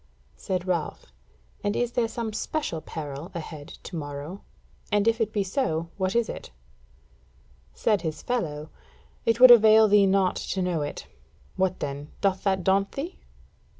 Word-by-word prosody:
Said 185 -2 -3
Ralph: 170 - -3 0.5
"And 205 0 0
is 245 -1 0
there 240 -2 +1
some 225 -1 -4
special 215 - -3
peril 150 +1 -7
ahead 155 -3 -7 0.2
to 180 - -8
morrow? 145 +4 -6 0.5
And 205 +1 +2
if 230 +1 +2
it 220 -1 +1
be 210 -3 0
so, 170 - -1
what 190 0 -1
is 235 -2 +2
it?" - - -7 1.3
Said 210 -3 +1
his 155 -3 -4
fellow: 155 -11 -3 0.6
"It 230 +1 +3
would 255 0 +10
avail 220 -1 +8
thee 205 -1 +5
naught 190 -1 +2
to 190 - -3
know 175 -4 0
it. 145 0 -5 0.5
What 185 -1 0
then, 140 +1 -4
doth 195 -2 +1
that 190 -2 +1
daunt 195 +1 +2
thee?" 310 +7 -5
190 Hz, 155 wpm, -26 LUFS, 160-220 Hz, 1.3 s, would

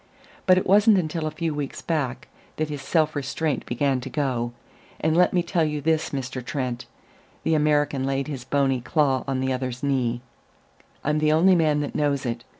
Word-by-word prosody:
But 185 -1 +7
it 185 - +1
wasn't 205 +2 +5
until 160 -2 -1
a - - 0
few 160 +1 -3
weeks 145 -2 -5
back 145 -6 -2 0.3
that 155 0 -2
his 145 -2 -5
self 155 +1 +1
restraint 145 0 -2
began 130 +1 0
to 130 - -6
go; 125 -5 -1 0.5
and 160 +1 +1
let 180 +1 +4
me 175 -1 +1
tell 170 -1 +1
you 150 -1 -1
this, 160 +2 +1
Mr. 130 -2 -4
Trent" 125 -2 -3 0.6
the 160 - +1
American 150 -3 +2
laid 135 +1 -1
his 135 -5 -5
bony 135 -1 +1
claw 135 -1 +1
on 135 -1 -1
the 130 0 0
other's 130 -1 -4
knee 125 -4 0 0.8
"I'm 150 +1 +1
the 155 0 +3
only 170 +5 +5
man 155 -4 +2
that 145 - -4
knows 140 -2 0
it. 120 -1 -3
145 Hz, 190 wpm, -24 LUFS, 130-155 Hz, 0.8 s, But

